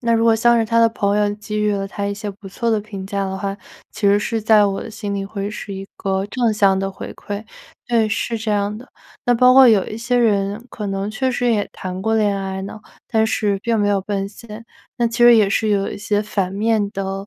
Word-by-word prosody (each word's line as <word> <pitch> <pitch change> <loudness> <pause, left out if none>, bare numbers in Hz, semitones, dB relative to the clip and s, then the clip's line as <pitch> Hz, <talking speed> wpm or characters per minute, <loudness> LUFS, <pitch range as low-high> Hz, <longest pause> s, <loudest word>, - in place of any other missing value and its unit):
那 235 -1 +1
如 225 0 +2
果 225 -1 +5
像 235 +1 +4
是 225 - +2
他 230 +1 +1
的 230 - +6
朋 205 -2 0
友 205 0 +1
给 210 0 -5
予 210 0 +1
了 195 -1 -2
他 200 0 -4
一 200 - -2
些 205 0 -5
不 195 0 -12
错 230 +4 -2
的 215 -1 +1
评 200 -3 -8
价 200 -1 -2
的 190 0 -4
话， 195 0 -4 0.3
其 210 -1 -2
实 200 +1 +4
是 225 +1 -2
在 215 -1 +5
我 195 -1 -1
的 225 - -8
心 205 -2 -5
里 195 0 -3
会 200 0 -5
是 205 -1 -7
一 195 0 -7
个 195 0 -1
正 235 0 0
向 195 -2 +3
的 195 0 -2
回 - - -8
馈， 205 +1 -6 0.4
对， 230 -2 +2
是 225 +1 -2
这 220 0 -3
样 205 0 0
的。 250 +4 -12 0.4
那 245 - +3
包 250 +2 +6
括 260 -1 +8
有 205 -4 +4
一 215 - -6
些 245 +1 0
人， 205 -1 +1
可 210 -3 -5
能 195 +1 -3
确 260 +4 -1
实 245 0 0
也 205 -2 0
谈 185 0 -6
过 220 +3 0
恋 210 -2 +2
爱 190 0 -4
呢， 205 +2 -8 0.3
但 220 0 +2
是 205 -3 0
并 230 +2 -1
没 205 0 +2
有 200 -1 +2
奔 195 0 -3
现， 220 +1 -11 0.3
那 240 -2 +1
其 230 +1 -4
实 240 -1 +7
也 210 -3 +4
是 220 +1 +1
有 200 -1 +1
一 - - -7
些 210 0 0
反 195 -3 -2
面 210 0 0
的， 195 -1 -4
210 Hz, 275 characters per minute, -20 LUFS, 200-225 Hz, 0.4 s, 括